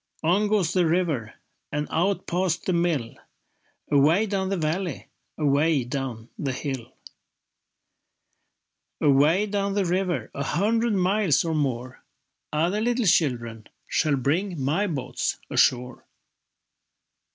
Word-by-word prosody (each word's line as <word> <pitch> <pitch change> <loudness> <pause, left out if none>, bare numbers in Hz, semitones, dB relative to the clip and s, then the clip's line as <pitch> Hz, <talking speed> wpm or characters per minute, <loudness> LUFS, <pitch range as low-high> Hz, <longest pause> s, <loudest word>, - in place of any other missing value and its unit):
On 190 +6 +3
goes 200 -5 +1
the 180 -3 +3
river 160 -10 0 0.4
And 150 0 -2
out 185 +4 0
past 180 -1 -1
the 185 - +1
mill, 170 -9 0 0.8
Away 155 +9 +4
down 195 -2 -1
the 195 - -1
valley, 170 +3 -2 0.3
Away 150 -1 +2
down 125 -3 -5
the 135 -2 -2
hill. 135 -2 -5 2.1
Away 150 +8 +4
down 200 -1 -1
the 200 -2 +1
river, 180 0 -1
A 140 - -4
hundred 225 +6 +1
miles 185 -3 +2
or 165 - -1
more, 130 -4 -2 0.5
Other 170 +7 0
little 240 0 +1
children 120 - +1 0.2
Shall 150 -3 +1
bring 160 +7 -1
my 155 +10 0
boats 135 -7 -2
ashore. 125 0 +1
165 Hz, 120 wpm, -25 LUFS, 140-190 Hz, 2.1 s, Away